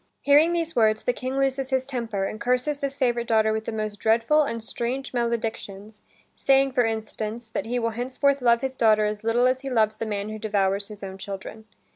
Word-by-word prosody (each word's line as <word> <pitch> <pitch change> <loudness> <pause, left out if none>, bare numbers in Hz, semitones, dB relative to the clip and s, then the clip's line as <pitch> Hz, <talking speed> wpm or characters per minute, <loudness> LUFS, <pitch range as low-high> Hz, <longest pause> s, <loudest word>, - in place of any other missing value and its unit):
Hearing 295 +4 +5
these 330 -1 -2
words, 220 -2 +3
the 245 - +1
King 255 +2 -4
loses 270 -1 0
his 260 -1 +1
temper, 230 -7 -3
and 215 +3 -6
curses 250 +4 0
this 275 -1 -3
favorite 240 -3 0
daughter 220 -1 +3
with 220 0 -3
the - - -3
most 215 -2 -4
dreadful 230 +8 +3
and 230 -6 -2
strange 250 +4 -4
maledictions, 225 -3 -3 0.3
saying, 270 0 +3
for 250 -1 +2
instance, 220 +1 -4
that 220 - -3
he 245 +2 -1
will 230 -1 0
henceforth 260 +4 0
love 235 -1 +4
his 265 -1 -2
daughter 215 -4 +3
as 210 0 -3
little 230 +2 +2
as 255 +1 +2
he 275 - -5
loves 215 -3 +2
the 225 - -4
man 205 0 -3
who 215 0 -6
devours 200 -2 0
his 210 -2 -11
own 190 0 -7
children. 200 +3 -7
230 Hz, 210 wpm, -25 LUFS, 215-260 Hz, 0.3 s, Hearing